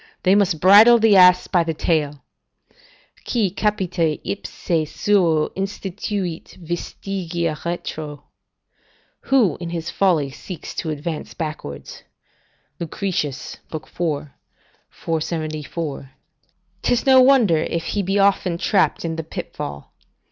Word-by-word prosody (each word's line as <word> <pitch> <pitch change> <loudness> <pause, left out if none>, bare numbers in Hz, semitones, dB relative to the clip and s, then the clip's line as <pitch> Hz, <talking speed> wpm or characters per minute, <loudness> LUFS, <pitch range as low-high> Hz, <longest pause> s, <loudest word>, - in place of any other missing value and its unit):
They 185 - +4
must 195 -6 +2
bridle 210 +7 +8
the 220 -2 +4
ass 180 -1 +7
by 175 -2 +2
the 165 -1 -3
tail: 150 -4 -1 1.0
"Qui 215 -7 0
capite 180 -6 0
ipse 165 -5 -2
suo 170 -7 +2
instituit 195 -2 -4
vestigia 175 -1 -4
retro," 155 -4 -5 1.1
["Who 240 - +3
in 170 -1 -5
his 170 0 -4
folly 165 -8 +1
seeks 170 +4 -8
to 160 - -2
advance 155 +1 -5
backwards" 150 - -6 0.8
Lucretius, 155 -5 -3
iv. 155 -1 -5 1.0
474] 155 -3 -4 0.7
'tis 245 -1 +1
no 260 -1 +7
wonder 255 -10 +5
if 165 +1 -2
he 205 - -1
be 195 +1 -1
often 195 -3 +2
trapped 190 -1 +1
in 165 -1 -3
the 160 - -3
pitfall. 70 - -7
170 Hz, 110 wpm, -21 LUFS, 155-195 Hz, 1.1 s, bridle